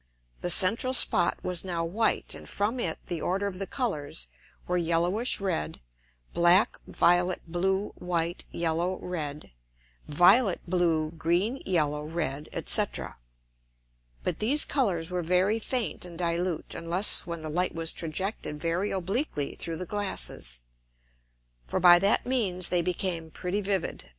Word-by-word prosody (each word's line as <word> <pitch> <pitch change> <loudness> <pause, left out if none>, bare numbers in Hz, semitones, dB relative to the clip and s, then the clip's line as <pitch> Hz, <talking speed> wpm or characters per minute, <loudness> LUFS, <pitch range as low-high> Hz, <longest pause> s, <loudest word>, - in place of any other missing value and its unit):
The 175 - -3
central 220 +8 +6
Spot 170 - +6
was 180 -2 0
now 170 -3 -3
white, 215 +7 0
and - - -10
from 215 +5 -2
it 165 -9 -1
the 170 -3 -4
order 195 +3 -1
of 190 -2 -5
the 195 - -4
Colours 145 - -3 0.4
were 180 - -2
yellowish 175 +7 +1
red; 190 - -3 0.5
black, 175 +4 +4
violet, 175 +1 +2
blue, 190 +4 -1
white, 170 -1 -2
yellow, 170 +2 -1
red; 150 - -5 0.6
violet, 185 - +4
blue, 165 -3 0
green, 175 +10 -1
yellow, 150 -5 0
red, 155 -2 -4 0.2
&c. - - +4 1.4
But - - -3
these 270 +8 +4
Colours 185 - -1
were 180 -1 -2
very 185 +6 +1
faint 245 0 -2
and 175 -2 -7
dilute, 170 -1 -2
unless 175 +3 +5
when 170 -1 -5
the 155 - -6
Light 180 +3 -1
was 165 -1 -1
trajected 165 -1 -3
very 170 +5 -2
obliquely 190 - -2
through 165 -1 -5
the 185 - -5
Glasses: 190 - -2 1.1
For - - -2
by 175 0 +7
that 200 +3 +2
means 200 -9 0
they 175 -1 +1
became 170 -1 -3
pretty 180 +5 -3
vivid. 190 - -3
180 Hz, 140 wpm, -27 LUFS, 165-195 Hz, 1.4 s, by